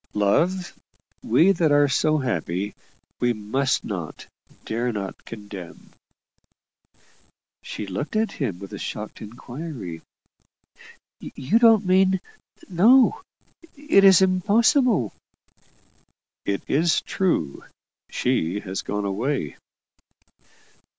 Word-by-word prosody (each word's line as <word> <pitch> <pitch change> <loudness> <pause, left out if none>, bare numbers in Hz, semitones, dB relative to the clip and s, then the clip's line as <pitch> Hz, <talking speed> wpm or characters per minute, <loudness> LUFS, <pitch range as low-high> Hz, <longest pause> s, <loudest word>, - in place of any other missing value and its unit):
"Love, 175 - +1 0.5
we 160 +12 +4
that 165 -5 +1
are 145 0 +5
so 155 +3 +2
happy, 100 - -2 0.5
we 120 0 +2
must 130 +6 -1
not, 90 -7 -6 0.4
dare 120 +2 -1
not 100 -3 -6
condemn." 100 -5 -10 1.7
She 105 - -6
looked 100 - -5
at 215 -1 +1
him 120 - -3
with 100 +1 -10
a - - -6
shocked 105 0 -6
inquiry. 120 - -8 1.2
"You 140 - -1
don't 225 -3 +5
mean 190 +1 +3 0.5
No; 235 - +4 0.6
it 290 -9 +3
is 190 -1 +7
impossible!" 205 - +2 1.3
"It 100 -1 -2
is 160 +4 +2
true. 180 - -1 0.5
She 105 -7 -1
has 95 0 -4
gone 105 0 -3
away." 100 - -2
135 Hz, 95 wpm, -23 LUFS, -, 1.7 s, is